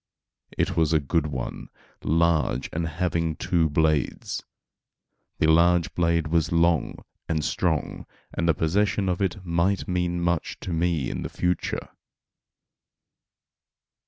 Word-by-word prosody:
It -, -, 0 dB
was 80 Hz, -1 st, +2 dB
a 80 Hz, -, +5 dB
good 75 Hz, +2 st, 0 dB
one, 65 Hz, -5 st, -5 dB, 0.3 s
large 80 Hz, -5 st, +1 dB
and 80 Hz, +1 st, -1 dB
having 85 Hz, -1 st, -1 dB
two 85 Hz, -3 st, +1 dB
blades. 75 Hz, -2 st, 0 dB, 1.0 s
The -, -, +2 dB
large 85 Hz, +2 st, +4 dB
blade 85 Hz, -2 st, +1 dB
was 85 Hz, -1 st, +1 dB
long 85 Hz, -3 st, +1 dB, 0.2 s
and 80 Hz, -2 st, 0 dB
strong, -, -, -1 dB, 0.3 s
and 85 Hz, 0 st, 0 dB
the 80 Hz, -, +4 dB
possession 95 Hz, +5 st, +1 dB
of 90 Hz, +1 st, -1 dB
it 95 Hz, 0 st, -2 dB
might 85 Hz, +3 st, +1 dB
mean 90 Hz, -1 st, 0 dB
much 85 Hz, -2 st, -1 dB
to 90 Hz, -, -4 dB
me 80 Hz, -5 st, 0 dB
in -, -, -4 dB
the -, -, -4 dB
future. 90 Hz, 0 st, -2 dB
85 Hz, 130 wpm, -25 LUFS, 80-90 Hz, 1.0 s, a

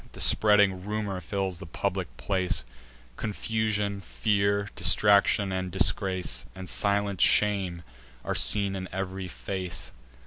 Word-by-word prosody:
The -, -, -10 dB
spreading 100 Hz, -3 st, +4 dB
rumour 105 Hz, -2 st, -3 dB
fills 95 Hz, 0 st, -3 dB
the -, -, -9 dB
public 80 Hz, -, -2 dB
place: 95 Hz, -10 st, -1 dB, 0.5 s
Confusion, 105 Hz, -1 st, -1 dB
fear, 100 Hz, 0 st, 0 dB
distraction, 100 Hz, -1 st, +3 dB
and 95 Hz, 0 st, -2 dB
disgrace, 95 Hz, 0 st, 0 dB
And 95 Hz, -1 st, -8 dB
silent 100 Hz, -1 st, +1 dB
shame, 95 Hz, -5 st, +3 dB, 0.4 s
are -, -, -1 dB
seen 100 Hz, -2 st, +1 dB
in 95 Hz, -1 st, -5 dB
ev'ry 95 Hz, 0 st, -4 dB
face. 90 Hz, -2 st, -5 dB
100 Hz, 115 wpm, -27 LUFS, 95-105 Hz, 0.5 s, spreading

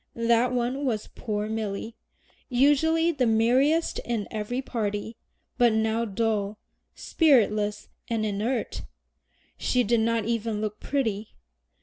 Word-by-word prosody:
That 235 Hz, +1 st, +2 dB
one 250 Hz, +3 st, -1 dB
was 225 Hz, -6 st, -2 dB
poor 210 Hz, -2 st, -3 dB
Milly, 220 Hz, +1 st, -4 dB, 0.5 s
usually 295 Hz, +6 st, +3 dB
the 265 Hz, -6 st, 0 dB
merriest 255 Hz, +9 st, +2 dB
in 230 Hz, -4 st, -3 dB
every 220 Hz, +3 st, -3 dB
party, 220 Hz, -4 st, -3 dB, 0.4 s
but 240 Hz, -2 st, +5 dB
now 220 Hz, +1 st, +1 dB
dull, 215 Hz, -1 st, -1 dB, 0.4 s
spiritless, 210 Hz, -, +2 dB, 0.2 s
and 225 Hz, -2 st, -1 dB
inert. 215 Hz, +5 st, -2 dB, 0.8 s
She 250 Hz, -1 st, +2 dB
did 235 Hz, +1 st, +2 dB
not 225 Hz, -1 st, +1 dB
even 225 Hz, -2 st, -1 dB
look 215 Hz, 0 st, -4 dB
pretty! 220 Hz, -7 st, -2 dB
230 Hz, 115 wpm, -26 LUFS, 215-250 Hz, 0.8 s, but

